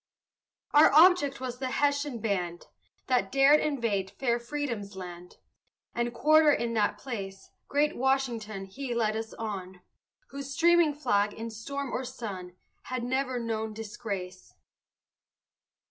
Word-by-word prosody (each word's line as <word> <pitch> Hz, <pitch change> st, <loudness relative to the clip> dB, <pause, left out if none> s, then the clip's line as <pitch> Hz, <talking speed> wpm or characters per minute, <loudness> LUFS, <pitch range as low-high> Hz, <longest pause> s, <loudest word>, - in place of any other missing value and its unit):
Our 295 Hz, +1 st, +7 dB
object 310 Hz, -4 st, +6 dB
was 250 Hz, -1 st, -5 dB
the 260 Hz, -1 st, -2 dB
Hessian 285 Hz, -1 st, 0 dB
band, 180 Hz, -5 st, -2 dB, 0.4 s
That 245 Hz, -7 st, +1 dB
dared 275 Hz, +2 st, +6 dB
invade 230 Hz, -10 st, -1 dB
fair 235 Hz, +3 st, -1 dB
freedom's 235 Hz, -6 st, -4 dB
land, 180 Hz, -1 st, -9 dB, 0.6 s
And 235 Hz, 0 st, -1 dB
quarter 300 Hz, +6 st, +5 dB
in 235 Hz, -4 st, 0 dB
that 210 Hz, -2 st, +1 dB
place. 195 Hz, -5 st, -7 dB, 0.2 s
Great 295 Hz, +2 st, +1 dB
Washington 240 Hz, -6 st, -1 dB
he 245 Hz, +5 st, -5 dB
led 220 Hz, -2 st, +1 dB
us 225 Hz, 0 st, -5 dB
on, 190 Hz, -4 st, -6 dB, 0.5 s
Whose 275 Hz, 0 st, -6 dB
streaming 335 Hz, -2 st, +4 dB
flag, 205 Hz, -8 st, +1 dB
in 225 Hz, +1 st, -6 dB
storm 275 Hz, +4 st, -5 dB
or 260 Hz, -, -2 dB
sun, 200 Hz, -8 st, -7 dB, 0.3 s
Had 255 Hz, -1 st, -3 dB
never 260 Hz, +1 st, -1 dB
known 220 Hz, -2 st, -3 dB
disgrace. 200 Hz, -4 st, -6 dB
235 Hz, 130 wpm, -29 LUFS, 205-275 Hz, 0.6 s, Our